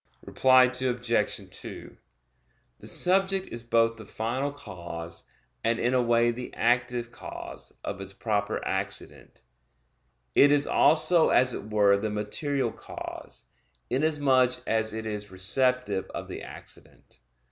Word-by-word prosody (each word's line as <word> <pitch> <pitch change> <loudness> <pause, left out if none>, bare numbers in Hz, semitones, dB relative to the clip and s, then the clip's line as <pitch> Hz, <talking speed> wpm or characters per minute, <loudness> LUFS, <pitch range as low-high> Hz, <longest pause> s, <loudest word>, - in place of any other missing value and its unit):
Reply 130 -1 +5
Obj. 125 -3 0
2: - - -6 0.8
The - - -10
subject 190 +1 +1
is 120 - -4
both 115 -1 +2
the 110 - -10
final 130 +6 -2
cause, 85 -10 -8 0.4
and 115 +1 +1
in 120 +2 +1
a 130 - +3
way 120 0 +3
the 125 +1 -6
active 120 0 0
cause, 120 - -9
of 95 - -5
its 95 0 -6
proper 100 0 -2
accident. - - -4 0.9
It 145 - +6
is 145 0 +4
also 160 +1 +4
as 125 -1 +4
it 105 - -6
were 100 -2 +4
the 110 +1 -2
material 130 +7 -2
cause, - - -8 0.5
inasmuch 135 -3 +3
as 110 0 +1
it 110 0 -5
is 105 -1 -4
receptive 100 +1 0
of - - -5
the - - -6
accident. - - -12
120 Hz, 130 wpm, -27 LUFS, 105-130 Hz, 0.9 s, It